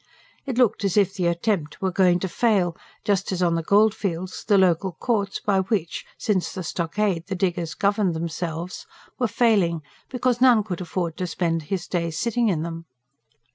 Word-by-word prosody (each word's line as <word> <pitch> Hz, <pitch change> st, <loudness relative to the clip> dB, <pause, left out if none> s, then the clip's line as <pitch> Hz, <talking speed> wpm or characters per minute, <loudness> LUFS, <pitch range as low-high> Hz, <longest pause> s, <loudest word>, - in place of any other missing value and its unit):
It 255 Hz, -3 st, -3 dB
looked 245 Hz, -5 st, +3 dB
as 195 Hz, 0 st, 0 dB
if 195 Hz, -2 st, +3 dB
the 185 Hz, -4 st, 0 dB
attempt 170 Hz, -2 st, -1 dB
were 190 Hz, -1 st, 0 dB
going 180 Hz, -1 st, +4 dB
to 190 Hz, -, -1 dB
fail, 190 Hz, -4 st, +1 dB, 0.3 s
just 200 Hz, -3 st, +1 dB
as 185 Hz, -1 st, 0 dB
on 170 Hz, -1 st, +3 dB
the 165 Hz, -, 0 dB
goldfields 195 Hz, -2 st, +1 dB
the 205 Hz, -2 st, +3 dB
Local 185 Hz, 0 st, +2 dB
Courts, 200 Hz, +1 st, -1 dB
by 200 Hz, -2 st, +1 dB
which 190 Hz, -4 st, -2 dB
since 200 Hz, -5 st, 0 dB
the 185 Hz, -2 st, -5 dB
Stockade 170 Hz, +2 st, -1 dB
the 195 Hz, -, -3 dB
diggers 175 Hz, -3 st, -1 dB
governed 200 Hz, -3 st, +1 dB
themselves, 165 Hz, +1 st, -4 dB, 0.3 s
were 245 Hz, -, +2 dB
failing, 200 Hz, -8 st, +2 dB, 0.3 s
because 250 Hz, -1 st, 0 dB
none 245 Hz, -5 st, +6 dB
could 185 Hz, -4 st, -5 dB
afford 175 Hz, -2 st, -3 dB
to 180 Hz, -, -2 dB
spend 165 Hz, -1 st, -1 dB
his 190 Hz, -3 st, -2 dB
days 170 Hz, -3 st, -2 dB
sitting 235 Hz, -1 st, +1 dB
in 160 Hz, -5 st, 0 dB
them. 165 Hz, 0 st, -6 dB
185 Hz, 175 wpm, -24 LUFS, 170-210 Hz, 0.3 s, none